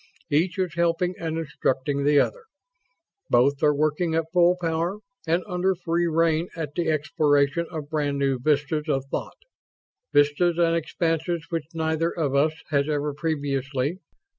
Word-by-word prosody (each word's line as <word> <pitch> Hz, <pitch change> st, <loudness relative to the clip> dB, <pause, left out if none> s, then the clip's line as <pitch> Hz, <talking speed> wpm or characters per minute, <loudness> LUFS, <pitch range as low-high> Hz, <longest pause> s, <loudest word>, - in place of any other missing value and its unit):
Each 165 Hz, +5 st, +1 dB
is 185 Hz, -4 st, -1 dB
helping 170 Hz, +1 st, +1 dB
and 160 Hz, -1 st, -3 dB
instructing 140 Hz, -2 st, -1 dB
the 145 Hz, 0 st, +5 dB
other. -, -, -1 dB, 0.8 s
Both 135 Hz, +3 st, +3 dB
are 150 Hz, -, +5 dB
working 155 Hz, +3 st, 0 dB
at 165 Hz, 0 st, -1 dB
full 180 Hz, 0 st, +4 dB
power 170 Hz, +3 st, -1 dB, 0.3 s
and 170 Hz, +3 st, +1 dB
under 185 Hz, 0 st, 0 dB
free 170 Hz, -1 st, 0 dB
rein 165 Hz, +1 st, +1 dB
at 155 Hz, -3 st, -5 dB
the 170 Hz, 0 st, -1 dB
exploration 150 Hz, +1 st, +1 dB
of 155 Hz, -3 st, -7 dB
brand 145 Hz, -2 st, 0 dB
new 135 Hz, -2 st, 0 dB
vistas 150 Hz, +3 st, 0 dB
of 135 Hz, -2 st, 0 dB
thought -, -, -4 dB, 0.7 s
vistas 150 Hz, +4 st, +3 dB
and 170 Hz, -1 st, +3 dB
expanses 165 Hz, 0 st, -1 dB
which 165 Hz, -1 st, -4 dB
neither 160 Hz, +1 st, 0 dB
of 155 Hz, -6 st, -2 dB
us 145 Hz, +3 st, +3 dB, 0.2 s
has 140 Hz, 0 st, +1 dB
ever 150 Hz, -1 st, -1 dB
previously 145 Hz, 0 st, -2 dB
160 Hz, 150 wpm, -25 LUFS, 145-170 Hz, 0.8 s, the